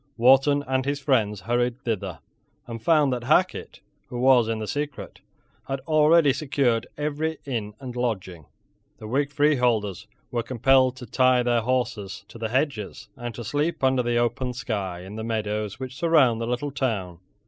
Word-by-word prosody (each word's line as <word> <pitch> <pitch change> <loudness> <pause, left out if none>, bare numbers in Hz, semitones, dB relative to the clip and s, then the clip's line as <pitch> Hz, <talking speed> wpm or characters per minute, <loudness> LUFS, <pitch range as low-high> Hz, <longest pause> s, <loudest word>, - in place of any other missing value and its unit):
Wharton 135 +4 +5
and 130 0 0
his 140 +1 -2
friends 110 -8 +1
hurried 120 +3 0
thither, 115 -5 -3 0.4
and 115 -1 -7
found 150 0 +3
that 120 -1 -4
Hacket, 180 +7 +1 0.3
who 125 - -6
was 125 -2 +5
in 115 -1 -1
the 110 - -4
secret, 145 +3 -5 0.5
had 135 0 -2
already 155 0 +4
secured 135 -5 0
every 150 +2 -2
inn 110 -6 -4
and 125 -2 -7
lodging. 95 - -3 0.5
The 110 - -9
Whig 140 +5 0
freeholders 125 - +1 0.2
were 120 -2 0
compelled 130 +2 +3
to 125 -1 -9
tie 130 +1 +3
their 120 -1 +2
horses 115 -5 -2
to 115 - -12
the 110 -1 -2
hedges, 130 -5 -2
and 120 -3 -6
to 120 - -6
sleep 145 +6 -2
under 130 -1 +3
the 120 -1 0
open 120 +2 0
sky 100 -8 -4
in 95 +4 -9
the 110 - -4
meadows 105 -1 -3
which 130 0 -7
surround 140 -8 +3
the 115 - -2
little 125 +4 -2
town. 100 -11 -2
125 Hz, 170 wpm, -25 LUFS, 115-140 Hz, 0.5 s, Wharton